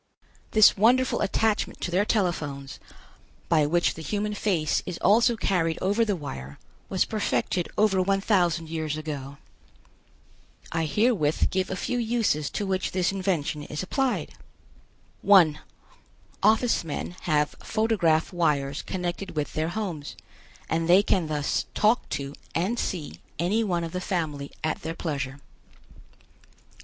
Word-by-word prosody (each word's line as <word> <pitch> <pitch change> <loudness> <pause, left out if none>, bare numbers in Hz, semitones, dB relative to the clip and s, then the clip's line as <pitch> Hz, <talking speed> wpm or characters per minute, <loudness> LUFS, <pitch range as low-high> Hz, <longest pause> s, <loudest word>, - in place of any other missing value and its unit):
This 215 -1 +6
wonderful 245 +5 +3
attachment 215 +1 0
to 175 - -2
their 190 +4 +2
telephones, 150 -10 -2 0.7
by 155 -3 +4
which 170 +3 +2
the 160 - -9
human 210 +5 -2
face 180 -7 0
is 180 -2 -4
also 235 +2 +4
carried 165 -6 0
over 205 +5 +2
the 210 -3 0
wire, 70 - -7 0.3
was 190 - +1
perfected 200 -4 -1
over 205 -3 +3
one 195 +1 +2
thousand 175 -5 +1
years 155 -2 -2
ago. 140 -3 -6 1.3
I 165 0 0
herewith 170 - +1
give 190 0 0
a 190 - -2
few 245 +6 -2
uses 225 - 0
to 205 - -3
which 190 -1 -1
this 185 0 +1
invention 180 -6 -1
is 150 +3 -5
applied. 265 +7 -1 0.9
1. 175 -7 +6 0.8
Office 220 +2 +3
men 165 +2 -5
have 150 -1 +2
photograph 195 -8 +1
wires 145 -5 0
connected 180 0 -4
with 150 -1 -2
their 155 +1 -1
homes, 175 -7 -4 0.5
and 165 +1 -1
they 185 +3 +7
can 185 -5 +1
thus 150 -2 -1
talk 215 +4 +2
to 140 0 -4 0.2
and 195 +8 0
see 145 - -4 0.2
any 195 +8 +1
one 175 -5 -1
of 165 - -4
the 180 - -3
family 155 -7 -3
at 155 0 -1
their 165 +1 -4
pleasure. 140 -5 -4
175 Hz, 140 wpm, -26 LUFS, 155-205 Hz, 1.3 s, they